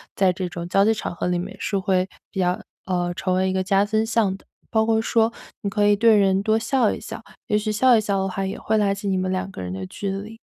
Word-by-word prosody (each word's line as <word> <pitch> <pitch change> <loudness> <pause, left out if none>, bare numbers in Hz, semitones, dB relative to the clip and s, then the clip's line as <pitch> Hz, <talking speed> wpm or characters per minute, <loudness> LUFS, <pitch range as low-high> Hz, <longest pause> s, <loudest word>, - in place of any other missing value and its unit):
在 190 -2 +3
这 185 0 -3
种 175 -1 -6
交 195 +2 +4
际 225 - +4
场 215 - -4
合 175 - -2
里 180 -1 +1
面 175 - -6
是 200 - -1
会 190 -1 +1 0.2
比 195 - -5
较 180 0 +1 0.2
呃， 175 -1 -1
成 185 +1 -1
为 190 0 +1
一 - - -1
个 190 - +1
加 195 +1 +3
分 220 +1 +1
项 220 -4 +1
的。 - - -24 0.3
包 220 -1 +3
括 225 -1 +2
说 225 0 +2 0.3
你 200 - -2
可 205 +1 +2
以 205 - +5
对 225 +1 +5
人 195 0 +3
多 220 +1 +2
笑 225 0 +2
一 - - -6
笑， - - -8 0.2
也 210 - +2
许 215 0 -1
笑 245 +4 +5
一 - - +2
笑 200 -2 0
的 190 - -1
话， 195 +1 -3
也 190 - -4
会 220 - 0
拉 200 -2 +2
起 200 +1 -5
你 190 -1 +1
们 185 0 -1
两 185 +1 -2
个 185 - -8
人 90 - -5
的 95 0 -5
距 200 - -5
离。 210 +3 -6
195 Hz, 300 characters per minute, -23 LUFS, 185-215 Hz, 0.3 s, 以